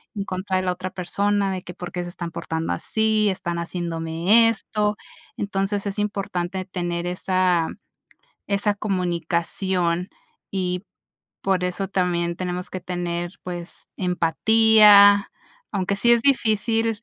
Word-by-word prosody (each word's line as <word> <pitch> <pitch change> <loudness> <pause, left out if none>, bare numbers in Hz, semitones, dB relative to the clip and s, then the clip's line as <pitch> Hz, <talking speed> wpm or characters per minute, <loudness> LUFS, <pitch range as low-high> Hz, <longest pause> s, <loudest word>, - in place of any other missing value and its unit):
en 200 -1 -3
contra 185 0 -2
de 185 - -1
la 185 - 0
otra 185 +1 -6
persona, 200 +2 0
de 185 - -4
que 175 - -9
por 180 -1 -8
qué 180 -1 -3
se 175 - -6
están 175 -1 -6
portando 160 0 -3
así, 220 -1 +1
están 175 -2 -3
haciéndome 170 +5 +2
esto. 210 -2 -1 0.4
Entonces, 200 0 -2
es 200 - -4
importante 190 -3 -3
tener 175 -2 -3
esa 180 -2 +1 0.8
esa 205 +1 +1
comunicación, 180 -2 -1 0.4
y 180 -2 -2 0.6
por 190 -2 +1
eso 180 +2 -2
también 175 -2 0
tenemos 180 0 -4
que 185 - -6
tener, 175 -1 -3
pues, 175 -1 -7
empatía, 205 +3 +5 0.4
aunque 200 -1 -1
sí 235 +4 +5
es 235 - +4
difícil 225 -3 +2
185 Hz, 130 wpm, -23 LUFS, 175-205 Hz, 0.8 s, empatía